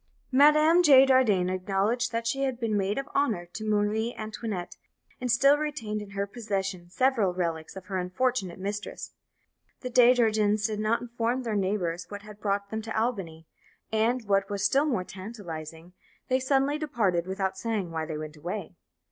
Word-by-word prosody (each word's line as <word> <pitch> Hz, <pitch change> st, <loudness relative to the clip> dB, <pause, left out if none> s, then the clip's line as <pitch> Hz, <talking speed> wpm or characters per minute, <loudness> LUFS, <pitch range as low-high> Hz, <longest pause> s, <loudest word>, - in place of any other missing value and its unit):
Madame 305 Hz, +5 st, +6 dB
de 275 Hz, -5 st, +8 dB
Jardin 235 Hz, -9 st, +3 dB
acknowledged 195 Hz, +6 st, 0 dB
that 230 Hz, 0 st, -2 dB
she 270 Hz, +4 st, -1 dB
had 260 Hz, -3 st, -1 dB
been 225 Hz, -3 st, -1 dB
maid 200 Hz, 0 st, 0 dB
of 275 Hz, 0 st, -3 dB
honour 225 Hz, -11 st, +1 dB
to 175 Hz, +5 st, -8 dB
Marie 215 Hz, +2 st, 0 dB
Antoinette, 215 Hz, -4 st, -5 dB, 0.4 s
and 250 Hz, -, -3 dB
still 275 Hz, +4 st, +5 dB
retained 230 Hz, -9 st, -3 dB
in 205 Hz, -, -9 dB
her 200 Hz, -, 0 dB
possession 195 Hz, -5 st, -4 dB
several 210 Hz, -2 st, +1 dB
relics 165 Hz, -2 st, -3 dB
of 190 Hz, -1 st, -9 dB
her 190 Hz, 0 st, -2 dB
unfortunate 185 Hz, 0 st, -1 dB
mistress. 205 Hz, +2 st, -5 dB, 0.7 s
The 250 Hz, -, -5 dB
De 245 Hz, 0 st, +7 dB
Jardins 215 Hz, -3 st, +2 dB
did 215 Hz, -1 st, -1 dB
not 215 Hz, +2 st, +1 dB
inform 240 Hz, +1 st, -2 dB
their 225 Hz, -3 st, -2 dB
neighbours 185 Hz, -3 st, -1 dB
what 205 Hz, 0 st, -8 dB
had 210 Hz, -1 st, -13 dB
brought 200 Hz, -1 st, -1 dB
them 220 Hz, 0 st, -2 dB
to 225 Hz, 0 st, -3 dB
Albany, 190 Hz, -9 st, -3 dB, 0.5 s
and, 225 Hz, +1 st, +1 dB
what 195 Hz, -1 st, +2 dB
was 200 Hz, -1 st, -2 dB
still 275 Hz, +8 st, +3 dB
more 240 Hz, -11 st, 0 dB
tantalizing, 175 Hz, -5 st, -8 dB, 0.4 s
they 260 Hz, 0 st, +3 dB
suddenly 275 Hz, +2 st, +1 dB
departed 200 Hz, -, 0 dB
without 190 Hz, 0 st, -2 dB
saying 205 Hz, -4 st, -3 dB
why 160 Hz, -1 st, -3 dB
they 155 Hz, -1 st, -4 dB
went 155 Hz, 0 st, -7 dB
away. 180 Hz, +6 st, -5 dB
210 Hz, 175 wpm, -27 LUFS, 190-245 Hz, 0.7 s, de